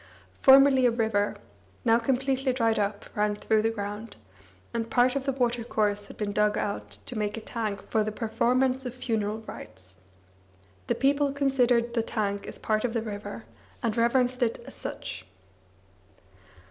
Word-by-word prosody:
Formerly 270 -1 +7
a - - +5
river, 220 -3 0 0.5
now 230 0 +5
completely 265 +2 0
dried 230 -3 +1
up, 205 0 -2
ran 210 0 +1
through 215 +1 +1
the 225 - +2
ground, 210 0 -5 0.6
and 230 -1 -2
part 250 +2 +3
of 275 -1 -2
the 275 - +1
watercourse 230 -5 0
had - - -12
been 210 -1 -2
dug 210 0 +2
out 105 - -3 0.2
to - - -6
make 210 0 -2
a - - -2
tank 215 -3 -4
for 220 -2 +3
the 215 - -2
performance 250 +4 +1
of 250 -1 -6
funeral 220 -3 -2
rites. 95 - -11 0.9
The - - +1
people 280 +1 +2
considered 250 -4 +2
the 235 - +2
tank 205 -3 -2
as - - -7
part 215 -1 0
of 245 -2 -1
the 225 - 0
river 210 -2 -6 0.4
and 225 -2 0
reverenced 250 +2 +2
it 230 -2 0
as - - -10
such. - - -6
230 Hz, 160 wpm, -27 LUFS, 210-250 Hz, 0.9 s, Formerly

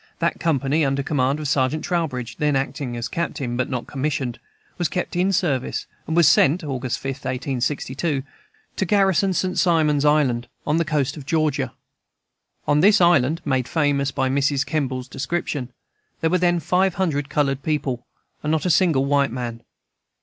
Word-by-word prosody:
That 170 0 -1
company, 150 -1 +1
under 135 0 0
command 135 0 0
of 150 - -3
Sergeant 135 +2 +1
Trowbridge, 145 -9 -2
then 150 -1 +1
acting 135 -2 -2
as 120 0 -3
Captain, 135 -5 -3
but 125 0 -1
not 125 -3 -3
commissioned, 135 -3 -2 0.4
was 175 - +2
kept 180 -2 -3
in 185 +2 +2
service, 145 -9 0 0.2
and 160 - -1
was 170 -4 +6
sent 160 +6 +4
(August 130 -4 -3
5, 135 - -3
1862) 135 +2 -2 0.5
to 190 - +1
garrison 195 0 +3
St. 185 +1 0
Simon's 155 -5 +3
Island, 145 -6 +2 0.2
on 150 +1 +1
the 170 - +1
coast 145 -2 -1
of 140 -3 -10
Georgia. 155 -3 0 0.9
On 145 - +3
this 205 +5 +6
island 165 -2 +3
(made 130 -3 0
famous 145 -3 +1
by 130 0 -1
Mrs. 140 +1 +1
Kemble's 130 -5 -2
description) 135 -1 -3 0.5
there 160 - +1
were 185 - +3
then 175 -1 +2
five 180 +3 +1
hundred 150 -7 -1
colored 140 -2 0
people, 135 -5 -2 0.3
and 150 - -1
not 160 +1 0
a 180 - +3
single 160 -7 +3
white 140 -1 +2
man. 120 -2 -5
145 Hz, 165 wpm, -22 LUFS, 130-165 Hz, 0.9 s, was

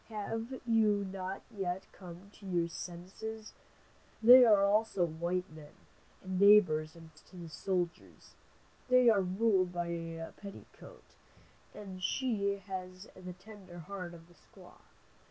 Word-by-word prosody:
Have 225 +4 -5
you 215 -3 +2
not 190 0 -6
yet 190 -1 -3
come 180 +1 -12
to 200 - -13
your 175 -2 0
senses? 190 +6 -8 0.7
They 250 +3 +10
are 205 -3 +5
also 205 -3 +2
white 170 +3 -2
men, 155 -1 -13 0.5
and 185 -1 -3
neighbors 180 -7 +5
and 165 -1 -14
friends 155 - -20
to 185 - -16
the 170 -1 -8
soldiers. 175 +1 -4 0.6
They 255 -1 +6
are 205 -3 +3
ruled 190 0 +1
by 175 -1 -3
a 165 -1 -5
petticoat, 200 -1 -13 0.6
and 190 -3 -9
she 200 0 0
has 185 0 -7
the 185 -1 -8
tender 185 -1 -13
heart 180 0 -7
of 165 0 -15
a - - -18
squaw. - - -18
185 Hz, 135 wpm, -32 LUFS, 175-205 Hz, 0.7 s, They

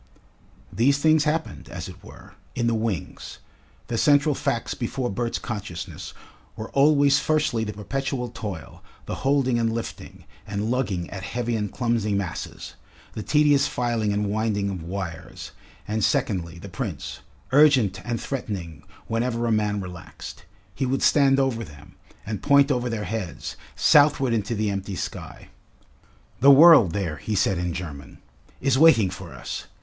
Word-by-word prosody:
These 130 +8 +3
things 155 +1 +3
happened, 160 +1 -2
as - - -6
it - - -12
were, - - -14 0.2
in 120 - 0
the 115 - +2
wings; 110 -8 -3 0.5
the 115 - -2
central 145 0 +4
facts 135 -4 -2
before 125 0 -3
Bert's 120 +3 -2
consciousness 105 -7 -6 0.4
were 110 - -7
always 140 0 +4
firstly 150 -7 +1
the 105 -1 -4
perpetual 125 +4 -3
toil, 100 -9 -7 0.2
the - - -4
holding 135 -3 +2
and 115 -1 +1
lifting, 115 0 -6 0.2
and 105 +2 -2
lugging 100 -9 -1
at 95 - -6
heavy 120 +3 -2
and 105 -2 -2
clumsy 115 -4 0
masses, 100 -4 -5 0.4
the 110 - -5
tedious 145 +1 +3
filing 115 -4 -1
and 105 +1 0
winding 105 -1 -1
of 95 -3 -5
wires, 85 -1 -6 0.4
and 110 +1 -1
secondly, 85 -4 0
the 85 - -9
Prince, 95 - -5 0.3
urgent 130 -10 +4
and 120 -2 -2
threatening 100 - -5 0.2
whenever 115 +1 -1
a 115 - +1
man 105 -2 +1
relaxed. 90 -4 -9 0.3
He 130 +7 -2
would 135 +1 0
stand 140 -2 +4
over 130 -4 0
them, 75 -5 -13 0.3
and 105 -2 -4
point 140 0 +4
over 125 -2 0
their 115 -2 -3
heads, 105 -6 -5 0.2
southward 145 -4 +4
into 115 +1 -1
the 105 -1 0
empty 100 0 -4
sky. - - -7 0.9
"The 135 +3 +6
world 140 - +8
there," 90 -7 -2
he 105 +9 -3
said 95 -2 +1
in 90 0 -1
German, 75 -5 -7 0.4
"is 135 -1 +2
waiting 115 - +6
for 95 -2 -9
us! - - -6
115 Hz, 155 wpm, -24 LUFS, 100-135 Hz, 0.9 s, world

